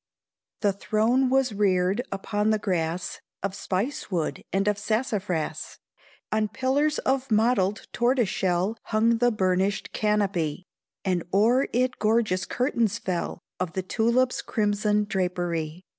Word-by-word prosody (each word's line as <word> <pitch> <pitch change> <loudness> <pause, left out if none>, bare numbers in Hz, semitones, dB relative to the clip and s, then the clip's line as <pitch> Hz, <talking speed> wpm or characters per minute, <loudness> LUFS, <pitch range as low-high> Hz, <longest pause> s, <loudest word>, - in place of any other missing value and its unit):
The 205 -2 +2
throne 225 +6 +2
was 265 -3 +2
reared 195 +1 +2
upon 205 +2 -1
the 215 - +3
grass 175 -4 -2 0.2
Of 195 -1 -1
spice 200 +7 -3
wood 170 -5 -2
and 195 +1 +1
of 210 -1 +1
sassafras; 205 -9 -2 0.5
On 215 0 +1
pillars 285 +6 +1
of 265 0 0
mottled 215 -2 +2
tortoise 240 -1 +2
shell 185 +4 0
Hung 225 +1 +2
the 245 0 +4
burnished 190 -2 0
canopy 190 -6 0 0.4
And 180 -3 +1
o'er 235 +7 +3
it 255 +2 0
gorgeous 215 -4 +2
curtains 235 -4 0
fell 180 -6 -3 0.2
Of 180 -3 -2
the 190 - -2
tulip's 235 +6 +1
crimson 210 -1 +1
drapery. 175 -3 -2
210 Hz, 130 wpm, -26 LUFS, 185-235 Hz, 0.5 s, the